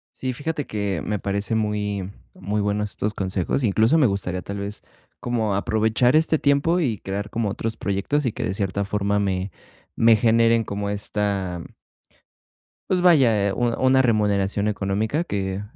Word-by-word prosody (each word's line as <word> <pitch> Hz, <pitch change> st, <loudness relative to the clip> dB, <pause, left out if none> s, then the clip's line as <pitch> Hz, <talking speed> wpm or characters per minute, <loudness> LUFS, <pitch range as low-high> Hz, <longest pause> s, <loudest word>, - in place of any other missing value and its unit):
Sí, 130 Hz, -1 st, -3 dB
fíjate 145 Hz, +3 st, -4 dB
que 100 Hz, -5 st, -2 dB
me 105 Hz, -1 st, -2 dB
parece 100 Hz, +3 st, -2 dB
muy 105 Hz, -3 st, -1 dB, 0.2 s
muy 105 Hz, +1 st, -2 dB
bueno 105 Hz, +1 st, 0 dB
estos 105 Hz, 0 st, -3 dB
consejos. 95 Hz, +6 st, -1 dB
Incluso 110 Hz, +7 st, +3 dB
me 145 Hz, -, +5 dB
gustaría 95 Hz, -3 st, -2 dB
tal 100 Hz, 0 st, -6 dB
vez 100 Hz, +1 st, -6 dB, 0.4 s
como 115 Hz, -4 st, -1 dB
aprovechar 110 Hz, +5 st, +2 dB
este 160 Hz, -1 st, +3 dB
tiempo 145 Hz, +5 st, +2 dB
y 115 Hz, -9 st, 0 dB
crear 100 Hz, +2 st, -5 dB
como 115 Hz, -2 st, -1 dB
otros 110 Hz, +2 st, -4 dB
proyectos 105 Hz, +10 st, -1 dB
y 115 Hz, -, 0 dB
que -, -, -6 dB
de 95 Hz, -, -1 dB
cierta 100 Hz, 0 st, -1 dB
forma 100 Hz, 0 st, 0 dB
me 95 Hz, -1 st, -1 dB, 0.5 s
me 115 Hz, -1 st, +5 dB
generen 115 Hz, +1 st, +3 dB
como 100 Hz, 0 st, -3 dB
esta, 100 Hz, -3 st, -2 dB
mm -, -, -11 dB, 1.2 s
pues 180 Hz, -1 st, +1 dB
vaya, 120 Hz, -, +4 dB
eh, 100 Hz, -, -1 dB
u 120 Hz, +2 st, 0 dB, 0.2 s
una 130 Hz, 0 st, +5 dB
remuneración 105 Hz, -3 st, +1 dB
económica 105 Hz, -, -1 dB
que 95 Hz, -, -3 dB
105 Hz, 165 wpm, -23 LUFS, 100-115 Hz, 1.2 s, me